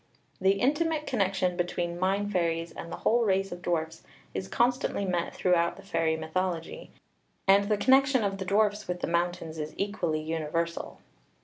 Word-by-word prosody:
' -, -, -38 dB
The 190 Hz, +1 st, +5 dB
intimate 300 Hz, +8 st, +1 dB
connection 190 Hz, -5 st, 0 dB
between 175 Hz, -1 st, -2 dB
mine 195 Hz, +2 st, +1 dB
fairies 170 Hz, -3 st, 0 dB
and 165 Hz, -, -8 dB
the -, -, -3 dB
whole 235 Hz, +1 st, +4 dB
race 195 Hz, -2 st, +1 dB
of 175 Hz, 0 st, -7 dB
dwarfs 165 Hz, -2 st, -2 dB, 0.3 s
is 95 Hz, 0 st, -4 dB
constantly 240 Hz, -, +1 dB
met 175 Hz, -2 st, -1 dB
throughout 170 Hz, -2 st, +2 dB
the 195 Hz, -, -13 dB
fairy 165 Hz, -4 st, 0 dB
mythology; 165 Hz, +1 st, -3 dB, 0.6 s
and 200 Hz, +1 st, +6 dB
the 210 Hz, -, +3 dB
connection 265 Hz, +2 st, +4 dB
of 195 Hz, -1 st, -1 dB
the 190 Hz, -, -3 dB
dwarfs 210 Hz, +1 st, +1 dB
with 180 Hz, 0 st, -3 dB
the -, -, +1 dB
mountains 170 Hz, -2 st, -1 dB
is 155 Hz, 0 st, -5 dB
equally 190 Hz, -6 st, -1 dB
universal. 165 Hz, +1 st, -2 dB
185 Hz, 170 wpm, -28 LUFS, 170-200 Hz, 0.6 s, and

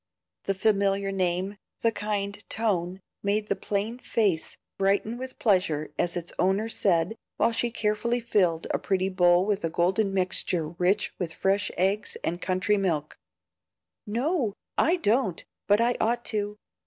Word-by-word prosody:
The 195 Hz, -, 0 dB
familiar 195 Hz, -1 st, +2 dB
name, 185 Hz, +1 st, -1 dB, 0.3 s
the 230 Hz, -, +4 dB
kind 205 Hz, -1 st, -3 dB
tone, 190 Hz, -4 st, 0 dB, 0.2 s
made 210 Hz, +1 st, 0 dB
the 200 Hz, -, +2 dB
plain 210 Hz, +5 st, -2 dB
face 205 Hz, -9 st, 0 dB, 0.2 s
brighten 200 Hz, +4 st, +1 dB
with 255 Hz, +1 st, -7 dB
pleasure 165 Hz, -8 st, +1 dB
as 175 Hz, 0 st, 0 dB
its 175 Hz, 0 st, -5 dB
owner 195 Hz, +4 st, +2 dB
said, 180 Hz, -2 st, +1 dB, 0.2 s
while 230 Hz, -, +3 dB
she 235 Hz, +1 st, 0 dB
carefully 225 Hz, +1 st, 0 dB
filled 185 Hz, -8 st, +1 dB
a -, -, 0 dB
pretty 190 Hz, -1 st, 0 dB
bowl 180 Hz, -1 st, +4 dB
with 205 Hz, -2 st, 0 dB
a 165 Hz, -, 0 dB
golden 185 Hz, +5 st, +1 dB
mixture 180 Hz, -3 st, 0 dB
rich 180 Hz, +5 st, 0 dB
with 175 Hz, -3 st, -2 dB
fresh 200 Hz, +2 st, +1 dB
eggs 195 Hz, +3 st, +1 dB
and 175 Hz, +2 st, -2 dB
country 185 Hz, +3 st, +1 dB
milk 165 Hz, -6 st, -1 dB, 0.9 s
"No, 245 Hz, -, 0 dB, 0.2 s
I 335 Hz, -, +4 dB
don't, 225 Hz, -, +1 dB, 0.2 s
but 205 Hz, +1 st, +5 dB
I 235 Hz, +1 st, +2 dB
ought 235 Hz, +2 st, +1 dB
to. 210 Hz, 0 st, -2 dB
200 Hz, 150 wpm, -27 LUFS, 180-215 Hz, 0.9 s, but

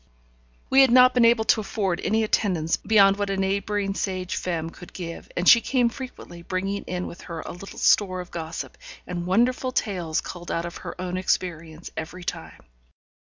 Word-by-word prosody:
We 270 Hz, -, +7 dB
had 265 Hz, -, +6 dB
not 255 Hz, +1 st, +7 dB
been 245 Hz, -2 st, +5 dB
able 230 Hz, -1 st, +4 dB
to 220 Hz, -, +3 dB
afford 195 Hz, -4 st, -2 dB
any 220 Hz, +1 st, +1 dB
attendance 180 Hz, -7 st, +1 dB
beyond 195 Hz, -2 st, +4 dB
what 205 Hz, -1 st, -1 dB
a 195 Hz, -, -1 dB
neighbouring 195 Hz, +1 st, -1 dB
sage 185 Hz, -2 st, -3 dB
femme 165 Hz, -2 st, -3 dB
could 180 Hz, -, -13 dB
give, 170 Hz, -2 st, -7 dB
and 175 Hz, -, 0 dB
she 235 Hz, -, +9 dB
came 245 Hz, -2 st, +2 dB
frequently, 235 Hz, -9 st, -9 dB
bringing 195 Hz, +3 st, -2 dB
in 180 Hz, 0 st, -3 dB
with 170 Hz, -, -9 dB
her 165 Hz, -1 st, -5 dB
a -, -, -7 dB
little 185 Hz, +3 st, -10 dB
store 185 Hz, -3 st, +3 dB
of 180 Hz, -, -8 dB
gossip, 165 Hz, -1 st, -6 dB, 0.3 s
and 175 Hz, -1 st, -4 dB
wonderful 250 Hz, +6 st, +2 dB
tales 180 Hz, -10 st, -1 dB
culled 175 Hz, -1 st, -8 dB
out 165 Hz, -, -1 dB
of 170 Hz, -, -6 dB
her -, -, -8 dB
own 180 Hz, 0 st, -3 dB
experience, 170 Hz, -3 st, -2 dB
every 175 Hz, +3 st, -6 dB
time. -, -, -6 dB
185 Hz, 185 wpm, -25 LUFS, 175-215 Hz, 0.3 s, she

